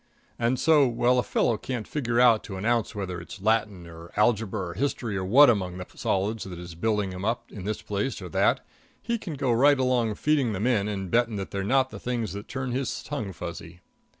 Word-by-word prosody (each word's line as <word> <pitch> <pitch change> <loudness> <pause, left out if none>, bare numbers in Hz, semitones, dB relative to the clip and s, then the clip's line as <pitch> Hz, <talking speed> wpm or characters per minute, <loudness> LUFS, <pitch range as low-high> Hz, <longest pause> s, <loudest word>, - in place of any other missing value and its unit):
And 120 +2 +1
so, 150 0 +5
while 125 +1 +2
a - - +4
fellow 115 - +1
can't 125 -5 -4
figure 120 -5 -1
out 120 -3 +5
to 100 - -7
an 95 - -5
ounce 115 -1 +1
whether 90 -4 -4
it's 90 - -10
Latin 105 -3 0
or 85 0 -11
algebra 105 -4 +1
or - - -6
history 115 -1 -2
or 95 - -2
what 130 +10 +7
among 95 -6 +1
the 90 - -6
solids 105 +3 -1
that 90 -2 -7
is 85 0 -8
building 105 +2 0
him 90 0 -7
up 115 +3 -2
in 95 -3 -8
this 105 0 -3
place 105 +5 -2
or 95 - -7
that, - - +2 0.3
he 235 0 -2
can 170 -7 -6
go 130 -2 0
right 140 +5 +5
along 125 -4 +1
feeding 140 -3 +1
them 100 +3 -2
in 110 -5 +2
and 95 -3 -4
betting 115 -1 +2
that 95 -1 -5
they're 100 -1 -2
not 130 +5 +2
the - - -8
things 120 -4 -3
that 100 +2 -7
turn 130 -1 -4
his 130 0 -2
tongue 130 -9 -4
fuzzy. 85 0 -8
110 Hz, 225 wpm, -26 LUFS, 95-125 Hz, 0.3 s, what